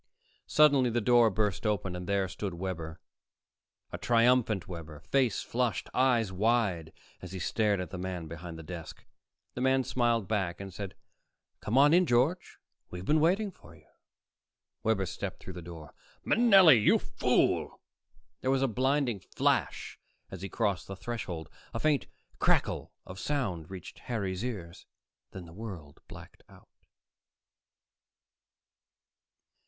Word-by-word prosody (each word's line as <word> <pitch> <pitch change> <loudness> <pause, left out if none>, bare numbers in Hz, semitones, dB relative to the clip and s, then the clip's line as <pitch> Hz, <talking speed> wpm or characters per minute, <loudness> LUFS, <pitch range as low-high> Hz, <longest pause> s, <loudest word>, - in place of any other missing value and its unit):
Suddenly 140 -4 +5
the 120 +1 0
door 120 0 +5
burst 105 -2 -1
open 100 -4 -1
and 90 0 -6
there 100 -1 +1
stood 95 0 -5
Webber, 85 -3 -5 0.9
a - - -6
triumphant 115 -4 +3
Webber, 80 -4 -8
face 130 +2 +1
flushed, 120 -2 -2
eyes 120 -6 +2
wide, 95 -5 +1 0.3
as 90 0 -9
he - - -4
stared 105 +2 +1
at 90 - -5
the 90 - -6
man 90 -2 -4
behind 85 +1 -8
the 80 - -9
desk. 80 0 -9 0.5
The 125 - -5
man 130 0 +3
smiled 120 -5 +1
back 95 -5 -1
and 100 -1 -8
said, 95 -1 -6 0.6
"Come 110 +5 -1
on 145 +3 +6
in, 180 0 +5
George. 135 +10 +1 0.3
We've 90 +1 -7
been 155 +6 +3
waiting 190 +6 +2
for - - -17
you." - - -21 1.0
Webber 110 -3 +1
stepped 95 +1 -5
through 95 - -9
the 90 - -8
door. 80 -3 -10 0.3
"Manelli, 195 - +7
you - - +5
fool!" - - 0 0.6
There 130 - -2
was 135 0 +2
a - - +3
blinding 130 -1 0
flash - - -1 0.3
as 95 - -8
he 100 - -5
crossed 100 -7 -1
the 95 - -6
threshold. 95 -6 -5 0.3
A - - -1
faint 150 -1 +1 0.3
crackle - - +1
of 95 +1 -9
sound 95 - -2
reached 95 -4 -9
Harry's 100 -5 -3
ears; 95 -9 -6 0.4
then 95 -2 -9
the 85 - -13
world 90 -8 -9
blacked - - -12
out.... - - -18
105 Hz, 145 wpm, -30 LUFS, 90-125 Hz, 1.0 s, Manelli